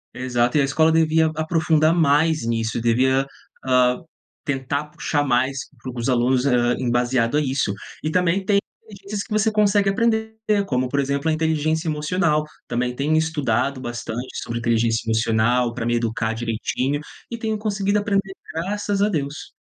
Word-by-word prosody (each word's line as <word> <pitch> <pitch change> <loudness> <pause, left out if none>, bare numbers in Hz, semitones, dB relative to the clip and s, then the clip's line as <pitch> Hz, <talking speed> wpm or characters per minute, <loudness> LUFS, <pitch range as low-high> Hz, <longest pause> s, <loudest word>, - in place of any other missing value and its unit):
Exato, 125 +1 0
e - - +5
a - - +3
escola 160 +4 +3
devia 160 0 +3
aprofundar 160 0 +2
mais 160 -3 +2
nisso, 115 0 -1
devia, 130 +4 +2 0.4
ah, 125 -1 +3 0.5
tentar 140 +1 -2
puxar 150 0 -2
mais 130 +1 +1 0.2
para 130 - -6
os 115 - -2
alunos, 125 +1 +2
ah, 120 -2 +2
embasado 120 0 +1
a 150 - +3
isso. 130 -7 0 0.3
E 155 - -1
também 180 0 +2
inteligencias 200 +1 +2 0.5
tem 205 -1 -3
que - - -26
você 215 +1 +2
consegue 205 -1 +3
aprender, 220 +1 0 0.3
como 130 -1 0
por 140 +2 -1
exemplo 140 +3 0
a - - +2
inteligência 160 +1 0
emocional, 155 0 +1 0.2
também 125 +1 -1
tenho 150 +4 +1
estudado 140 -4 0
bastante 120 +1 -5 0.2
sobre 115 0 -4
inteligência 115 -1 +1
emocional 115 +2 +2
para 115 - -4
me 120 0 +1
educar 115 -1 -1
direitinho, 120 +5 -2 0.3
e - - -2
tenho 220 -1 -2
conseguido 205 -1 0
aprender 195 -2 -1 0.2
graças 200 +4 -2
a 210 - +3
Deus. 145 -4 -4
140 Hz, 160 wpm, -22 LUFS, 125-165 Hz, 0.5 s, e